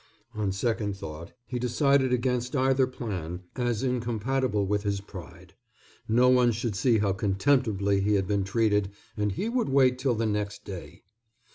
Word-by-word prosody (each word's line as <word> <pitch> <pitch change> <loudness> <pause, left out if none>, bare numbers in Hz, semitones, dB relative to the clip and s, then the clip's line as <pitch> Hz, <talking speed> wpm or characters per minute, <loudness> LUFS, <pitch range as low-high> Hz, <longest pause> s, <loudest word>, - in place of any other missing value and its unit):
On 105 -3 -1
second 105 0 -1
thought 80 -2 -8
he 125 - -4
decided 130 +2 +2
against 125 +1 0
either 130 0 +3
plan, 95 -9 -5
as 120 -2 -1
incompatible 120 -2 0
with 105 +1 0
his 100 -1 -1
pride. 95 -4 -11 0.5
No 120 +3 +4
one 125 -1 +5
should 115 -1 -3
see 115 +2 +3
how 100 -2 +1
contemptibly 100 -1 +1
he 105 +1 +2
had 95 -1 +1
been 100 -1 +1
treated, 105 -1 +1 0.3
and 105 -2 -1
he 200 - -2
would 240 - 0
wait 130 -2 +4
till 130 -2 +1
the 115 +1 -1
next 105 -1 -2
day. 95 -4 -9
110 Hz, 160 wpm, -27 LUFS, 100-125 Hz, 0.5 s, one